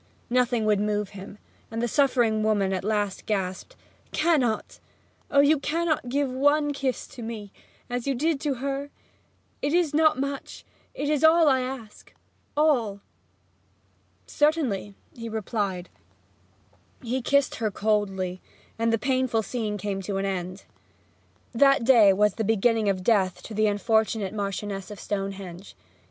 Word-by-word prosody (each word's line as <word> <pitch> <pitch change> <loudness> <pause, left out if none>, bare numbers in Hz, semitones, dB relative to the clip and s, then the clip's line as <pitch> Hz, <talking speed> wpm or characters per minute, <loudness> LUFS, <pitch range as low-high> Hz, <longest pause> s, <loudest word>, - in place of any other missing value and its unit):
Nothing 245 -2 +2
would 210 -2 +3
move 210 -1 -1
him; 200 +1 -10 0.3
and 225 - -4
the 240 - 0
suffering 240 -4 +2
woman 205 -3 +1
at 185 - -2
last 205 -2 -1
gasped, 195 - -3 0.4
'Cannot 285 -9 +1 0.5
oh, 280 0 +5 0.2
cannot 330 +1 0
you - - -6
give 280 0 0
one 290 +3 +2
kiss 270 -2 -2
to 245 - -11
me 220 -3 -6 0.4
as 245 +1 -4
you 275 - +1
did 305 +3 0
to 290 -3 -1
her? 275 +2 -3 0.7
It 290 - 0
is 340 -4 +2
not 310 -1 +4
much 275 0 -5 0.3
it 285 - -3
is 300 0 +1
all 320 0 +6
I 265 -2 +4
ask 255 -4 -8 0.4
all!' 240 -10 +2 1.2
'Certainly,' 275 -10 0 0.2
he 230 -1 -6
replied. 205 -4 -3 1.2
He 250 +2 -2
kissed 280 +2 +2
her 225 -1 0
coldly, 195 -3 -1 0.4
and 230 0 +2
the 225 - +2
painful 255 -2 0
scene 215 -1 -3
came 195 0 -3
to 195 0 -3
an 195 - -1
end. 185 -1 -4 0.9
That 275 +1 +4
day 230 -5 +7
was 210 +2 +3
the 225 - -2
beginning 225 0 +2
of 185 -2 -1
death 190 -4 +2
to 225 - -8
the 215 0 +2
unfortunate 210 -1 +1
Marchioness 200 -1 -4
of 210 - -9
Stonehenge. 195 -2 -5
225 Hz, 145 wpm, -26 LUFS, 200-275 Hz, 1.2 s, day